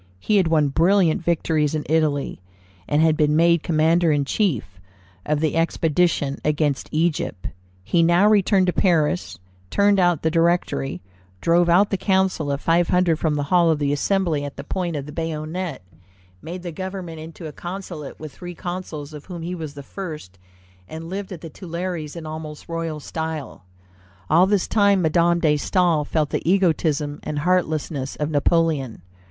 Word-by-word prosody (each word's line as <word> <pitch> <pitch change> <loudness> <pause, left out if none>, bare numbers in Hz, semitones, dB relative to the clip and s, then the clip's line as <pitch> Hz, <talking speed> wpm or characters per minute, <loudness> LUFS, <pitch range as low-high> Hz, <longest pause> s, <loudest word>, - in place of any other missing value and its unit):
He 210 - +1
had 185 -4 +3
won 155 -3 +3
brilliant 170 +2 +3
victories 160 -3 +1
in 150 - -3
Italy, 150 - 0 0.5
and 150 +2 +2
had 160 -1 +4
been 150 -1 +2
made 170 0 +4
commander 165 +1 +2
in 145 -2 +1
chief 125 - -1 0.5
of 150 0 +1
the 160 -1 0
expedition 165 -3 +1
against 150 -2 0
Egypt 155 - -1 0.3
He 170 - +2
now 175 +4 +4
returned 200 -2 +4
to 180 - +1
Paris, 175 -2 +1 0.3
turned 200 - +3
out 175 -4 +2
the 160 - +2
Directory, 165 - 0 0.4
drove 170 - +3
out 190 +4 +4
the 195 - +1
Council 190 -7 +1
of 140 +1 -2
Five 170 +1 +2
Hundred 180 -3 +2
from 155 -2 0
the 145 - -1
hall 175 -2 +5
of 160 - +2
the 145 -1 0
Assembly 165 -1 0
at 145 -1 -7
the - - -6
point 175 -3 -3
of 140 -2 -4
the 150 - -8
bayonet, 160 - -4 0.6
made 175 +2 -7
the 175 - -5
government 185 -1 -6
into 160 +1 -9
a 155 - -5
consulate 175 -3 -7
with 155 -2 -8
three 175 0 -9
consuls, 165 -4 -6
of 150 -1 -10
whom 175 -3 -7
he 175 +2 -4
was 155 -4 -6
the 140 - -8
first, 150 - -8 0.5
and 165 +2 -7
lived 195 0 -5
at 175 - -7
the 165 - -8
Tuileries 170 -2 -5
in 165 -2 -7
almost 155 -1 -7
royal 165 -2 -3
style. 160 - -5 0.7
All 175 +4 +6
this 200 -2 +1
time 200 -3 +3
Madame 170 +2 +3
de 155 -3 +4
Staël 165 -2 +1
felt 155 -3 0
the - - -1
egotism 155 -6 +1
and 150 - -4
heartlessness 155 -4 0
of 150 +1 -2
Napoleon. 145 - +1
165 Hz, 170 wpm, -22 LUFS, 150-175 Hz, 0.7 s, All